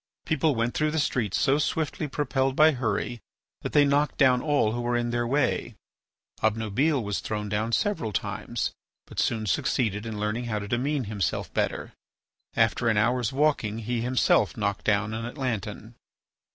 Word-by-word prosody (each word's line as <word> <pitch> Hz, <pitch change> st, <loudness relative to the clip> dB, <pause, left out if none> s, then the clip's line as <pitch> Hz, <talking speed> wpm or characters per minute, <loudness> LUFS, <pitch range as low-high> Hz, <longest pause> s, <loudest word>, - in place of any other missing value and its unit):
People 160 Hz, -2 st, +1 dB
went 115 Hz, +1 st, 0 dB
through 155 Hz, 0 st, +1 dB
the 155 Hz, -, -2 dB
streets 120 Hz, -, 0 dB
so 140 Hz, +2 st, +3 dB
swiftly 155 Hz, 0 st, -1 dB
propelled 135 Hz, -2 st, 0 dB
by 155 Hz, +2 st, +6 dB
hurry 120 Hz, -2 st, -2 dB, 0.4 s
that -, -, -4 dB
they 145 Hz, -1 st, +5 dB
knocked 145 Hz, +1 st, +1 dB
down 130 Hz, -3 st, +4 dB
all 145 Hz, -7 st, +2 dB
who 120 Hz, +2 st, -2 dB
were 120 Hz, 0 st, 0 dB
in 120 Hz, 0 st, -1 dB
their 120 Hz, 0 st, 0 dB
way. 145 Hz, +4 st, 0 dB, 0.7 s
Obnubile 115 Hz, +6 st, +1 dB
was 105 Hz, -1 st, -2 dB
thrown 105 Hz, -1 st, -3 dB
down 105 Hz, +2 st, -1 dB
several 195 Hz, -, 0 dB
times, 90 Hz, -, -3 dB, 0.3 s
but -, -, -7 dB
soon 110 Hz, -1 st, 0 dB
succeeded 105 Hz, +2 st, 0 dB
in 110 Hz, -2 st, -5 dB
learning 105 Hz, +3 st, -1 dB
how 110 Hz, -2 st, -2 dB
to 100 Hz, -1 st, -4 dB
demean 135 Hz, +5 st, 0 dB
himself 100 Hz, -, -2 dB
better; -, -, -2 dB, 0.6 s
after 115 Hz, +1 st, +2 dB
an 110 Hz, -, +2 dB
hour's 120 Hz, +1 st, +2 dB
walking 135 Hz, -7 st, +1 dB
he 115 Hz, +1 st, -2 dB
himself 125 Hz, 0 st, +2 dB
knocked 100 Hz, -2 st, -2 dB
down 110 Hz, +1 st, +1 dB
an 115 Hz, +1 st, -3 dB
Atlantan. 120 Hz, -, -4 dB
120 Hz, 165 wpm, -26 LUFS, 110-140 Hz, 0.7 s, by